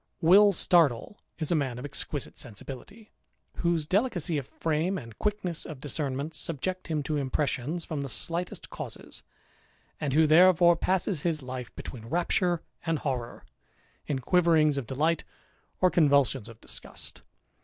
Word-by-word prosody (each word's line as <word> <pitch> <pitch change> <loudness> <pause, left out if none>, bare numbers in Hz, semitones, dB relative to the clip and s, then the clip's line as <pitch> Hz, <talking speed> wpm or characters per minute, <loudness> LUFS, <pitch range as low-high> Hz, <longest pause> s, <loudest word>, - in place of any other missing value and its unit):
Will 200 +5 +7
Startle 170 - +2 0.2
is 155 -1 -2
a - - +4
man 135 -5 -1
of 125 - -6
exquisite 145 0 -3
sensibility, 135 - -8 0.5
whose 170 -3 +1
delicacy 180 - +1
of 135 - -8
frame 165 +4 -1
and 115 - -9
quickness 205 -5 -1
of 155 -5 -8
discernment 145 +1 -3
subject 180 +5 -4
him 155 -3 -1
to 150 +2 -1
impressions 145 +3 -1
from 155 -3 -3
the 140 - -4
slightest 170 +9 -2
causes; - - -7 0.8
and 140 -3 -1
who 160 +2 +5
therefore 175 +2 +6
passes 185 -2 0
his 155 -4 -1
life 125 -1 -6
between 115 -3 -8
rapture 175 +2 +1 0.2
and 165 -1 0
horrour, 130 -5 -4 0.6
in 145 - 0
quiverings 155 0 +3
of 125 - -7
delight, 155 +6 +1 0.6
or 185 -1 +5
convulsions 140 -7 +3
of 115 -1 -13
disgust. - - -7
155 Hz, 145 wpm, -28 LUFS, 135-175 Hz, 0.8 s, Will